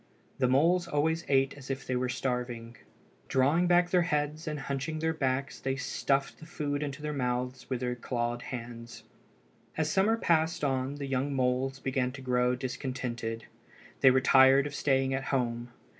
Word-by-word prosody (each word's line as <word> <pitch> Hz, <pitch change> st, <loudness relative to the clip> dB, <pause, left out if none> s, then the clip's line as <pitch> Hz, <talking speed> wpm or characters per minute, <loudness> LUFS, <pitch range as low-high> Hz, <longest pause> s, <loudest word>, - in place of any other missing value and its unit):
The 130 Hz, -, +3 dB
moles 170 Hz, +7 st, +3 dB
always 160 Hz, +3 st, 0 dB
ate 135 Hz, 0 st, +3 dB
as 140 Hz, -1 st, -12 dB
if 135 Hz, 0 st, -3 dB
they 130 Hz, -, -1 dB
were 125 Hz, 0 st, 0 dB
starving. 125 Hz, -2 st, -3 dB, 0.5 s
Drawing 145 Hz, +7 st, +3 dB
back 175 Hz, 0 st, +4 dB
their 180 Hz, -, +4 dB
heads 155 Hz, -1 st, -1 dB
and 150 Hz, -2 st, -3 dB
hunching 140 Hz, +3 st, -3 dB
their 160 Hz, +1 st, 0 dB
backs 135 Hz, -2 st, -1 dB
they 135 Hz, 0 st, -1 dB
stuffed 135 Hz, +1 st, -1 dB
the 160 Hz, -, -12 dB
food 145 Hz, -3 st, -3 dB
into 145 Hz, 0 st, -5 dB
their 150 Hz, 0 st, -2 dB
mouths 125 Hz, -1 st, -2 dB
with 130 Hz, -2 st, -2 dB
their 125 Hz, -1 st, -1 dB
clawed 120 Hz, 0 st, -2 dB
hands. 115 Hz, -2 st, -8 dB, 0.7 s
As 155 Hz, -1 st, 0 dB
summer 205 Hz, +5 st, +3 dB
passed 160 Hz, -6 st, +1 dB
on 135 Hz, 0 st, 0 dB
the 145 Hz, -1 st, -5 dB
young 135 Hz, +1 st, -1 dB
moles 130 Hz, +1 st, 0 dB
began 130 Hz, -1 st, -1 dB
to 140 Hz, -, -9 dB
grow 125 Hz, 0 st, +2 dB
discontented. 125 Hz, -3 st, -4 dB, 0.5 s
They 130 Hz, -, +7 dB
were 130 Hz, 0 st, +4 dB
tired 135 Hz, +1 st, +6 dB
of 145 Hz, -, -5 dB
staying 135 Hz, -2 st, +1 dB
at 135 Hz, 0 st, -2 dB
home. 120 Hz, -2 st, -1 dB
135 Hz, 175 wpm, -30 LUFS, 125-150 Hz, 0.7 s, They